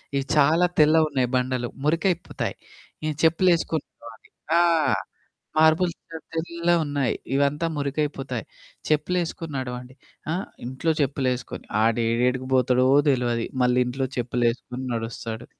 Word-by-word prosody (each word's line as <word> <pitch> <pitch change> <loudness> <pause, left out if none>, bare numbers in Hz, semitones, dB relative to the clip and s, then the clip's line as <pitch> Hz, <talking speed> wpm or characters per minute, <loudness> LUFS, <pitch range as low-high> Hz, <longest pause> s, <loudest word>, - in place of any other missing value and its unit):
ఇవి 135 0 0
చాలా 160 +5 +5
తెల్లవున్నాయి. 150 -4 +4
బండలు 125 -1 0 0.2
మురికైపోతాయి. 165 +3 0 0.5
ఈ - - 0
చెప్పులేసుకొని 165 -2 +3 0.2
బోవాలి. 115 -1 -13 0.3
ఆ! - - +6 1.0
మార్బుల్స్ 160 +2 +4 0.4
తెల్లగున్నాయి 160 -5 0 0.2
ఇవంతా 145 +4 +1
మురికైపోతాయి. 140 -4 -2 0.4
చెప్పులేసుకొని 165 +1 -1
నడవండి. 125 0 -6 0.4
ఆహ్, 185 +4 -2 0.2
ఇంట్లో 130 +6 -1
చెప్పులేసుకొని 130 -2 -2 0.2
ఆడేడేడికి 120 +3 +1
పోతాడో 125 0 +3 0.2
తెలవదు 120 -3 +1 0.2
మళ్ళీ 125 0 +3
ఇంట్లో 130 +2 -2
చెప్పులేసుకొని 125 +1 -1
నడుస్తడు. 115 0 -5
135 Hz, 95 wpm, -24 LUFS, 125-160 Hz, 1.0 s, ఆ